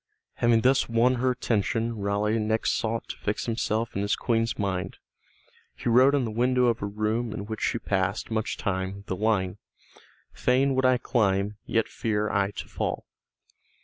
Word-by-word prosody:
Having 120 -1 +3
thus 130 +2 +3
won 115 +2 +3
her 130 - +3
attention 115 -1 0
Raleigh 105 +2 0
next 110 +1 0
sought 115 0 -2
to - - -6
fix 105 - -2
himself 115 -1 -1
in 100 - 0
his 100 +1 +1
Queen's 115 -2 0
mind. 95 -3 -2 0.8
He - - -3
wrote 130 +4 +6
on 135 -3 +1
the 110 - -3
window 125 +3 +2
of 120 -1 +1
a 100 - -1
room 110 +3 -1
in 100 - -5
which 110 +1 -6
she - - +1
passed 100 0 -1
much 110 0 -1
time 95 0 -3
the 95 - -3
line: 105 -2 0 0.7
"Fain 135 +2 +2
would 130 0 +1
I 130 -1 +4
climb, 105 -4 0
yet 115 -1 +1
fear 105 -1 -1
I 100 0 +1
to 100 - -7
fall." - - -3
110 Hz, 175 wpm, -26 LUFS, 100-120 Hz, 0.8 s, wrote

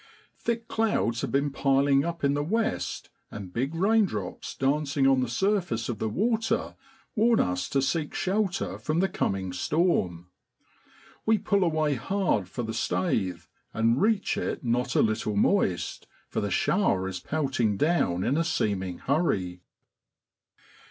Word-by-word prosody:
Thick 230 -1 -2
clouds 210 - 0
have - - -3
been 140 +1 +1
piling 135 0 +3
up 170 0 -4
in 140 0 +3
the 145 - 0
west, 220 +8 -2 0.2
and 95 -3 -8
big 135 +7 -2
raindrops 190 - 0
dancing 140 0 +1
on 135 -1 +4
the 125 - -1
surface 170 - 0
of 115 -4 -3
the 110 - -1
water 225 - 0 0.4
warn 230 +1 +4
us 90 0 0
to 135 -1 +1
seek 150 +2 -1
shelter 195 -1 -1
from 155 +2 -1
the 190 - +3
coming 95 - -2
storm. 90 - 0 0.9
We 220 0 +3
pull 200 -1 +1
away 155 -3 +1
hard 135 - 0
for 120 - -4
the 110 - -3
staith, 90 -3 -1 0.3
and 115 +3 +2
reach 215 -1 +1
it - - -3
not 125 +1 0
a - - +5
little 110 -1 -1
moist, 100 - +1 0.2
for - - -2
the - - -1
shower 95 0 +1
is 95 -1 -4
pelting 130 - 0
down 120 - +1
in 140 - +1
a 165 - +2
seeming 95 - -1
hurry. 95 - -1
135 Hz, 150 wpm, -27 LUFS, -, 0.9 s, a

